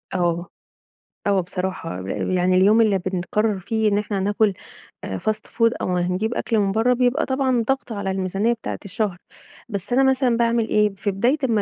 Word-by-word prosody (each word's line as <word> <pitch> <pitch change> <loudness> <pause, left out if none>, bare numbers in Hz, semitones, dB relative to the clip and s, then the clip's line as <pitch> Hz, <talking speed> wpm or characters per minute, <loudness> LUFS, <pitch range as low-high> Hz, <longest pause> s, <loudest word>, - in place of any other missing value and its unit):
آه، 175 -1 0 0.8
آه 200 -1 +3
بصراحة، 180 - -4
ل 95 - -2
يعني 185 +1 +3
اليوم 205 +5 +5
اللي 210 -4 +3
بنقرّر 190 +3 -1
فيه 220 +3 0
إن 205 - +2
إحنا 205 -1 -2
ناكل 205 +1 +2 0.5
آآ 95 - -4
fast 215 - -2
food 230 -1 +2
أو 180 -1 0
هنجيب 180 +6 -1
أكل 225 -2 0
من 200 -1 +1
برّه 225 +4 +3
بيبقى 250 +4 +1
طبعًا 260 -3 +1
ضغط 270 -2 -1
على 200 -3 -2
الميزانية 195 +4 0
بتاعة 230 - -6
الشهر. 200 -1 -2 0.5
بس 200 +1 -4
أنا 265 +2 +4
مثلًا 260 -3 +2
باعمل 235 -1 +2
إيه، 210 0 +3
في 200 +1 -2
بداية 235 +9 +1
أمّا 220 -2 +2
210 Hz, 180 wpm, -22 LUFS, 185-230 Hz, 0.8 s, اليوم